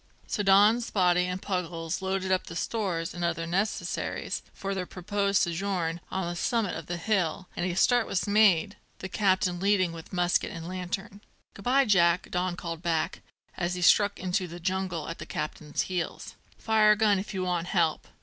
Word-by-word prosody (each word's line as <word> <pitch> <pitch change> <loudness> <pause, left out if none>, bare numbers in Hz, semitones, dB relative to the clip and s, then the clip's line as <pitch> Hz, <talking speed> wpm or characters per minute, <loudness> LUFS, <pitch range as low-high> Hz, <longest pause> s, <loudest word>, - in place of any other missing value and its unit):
So 210 - -2
Don, 205 +3 +6
Spottie, 180 -5 +2
and 180 0 -3
Puggles 170 -4 -3
loaded 190 0 -1
up 185 - +3
with - - -22
the 165 - -7
stores 175 -4 -2
and 175 - -5
other 165 -1 -1
necessaries 190 +5 -2
for 195 0 -4
their 185 -2 -3
proposed 200 +2 0
sojourn 170 -1 -2
on 190 -2 -2
the 175 - -3
summit 220 +2 0
of - - -7
the 175 - -3
hill, 185 -1 -1
and 175 - -1
a 175 - -3
start 245 +4 +3
was 185 - -1
made, 205 -2 +4 0.2
the 190 - -6
captain 185 -2 +1
leading 190 -2 +2
with 165 -1 -10
musket 180 -1 +1
and 165 0 -7
lantern. 185 +2 -5 0.3
"Good 195 - -12
bye, 270 +2 +4
Jack!" 175 -5 +3
Don 180 0 -1
called 165 -2 -6
back, 165 -2 -1 0.3
as 175 0 -1
he 180 - -3
struck 205 +3 +4
into 185 0 -1
the 170 +1 -9
jungle 185 -2 -2
at 165 - -6
the - - -7
captain's 150 0 -3
heels. 180 -2 -4 0.2
"'Fire 215 -1 +4
a - - -1
gun 210 -2 +3
if 195 +1 -6
you 185 - -1
want 175 -1 -1
help." 170 -5 +1
185 Hz, 190 wpm, -28 LUFS, 175-200 Hz, 0.3 s, Don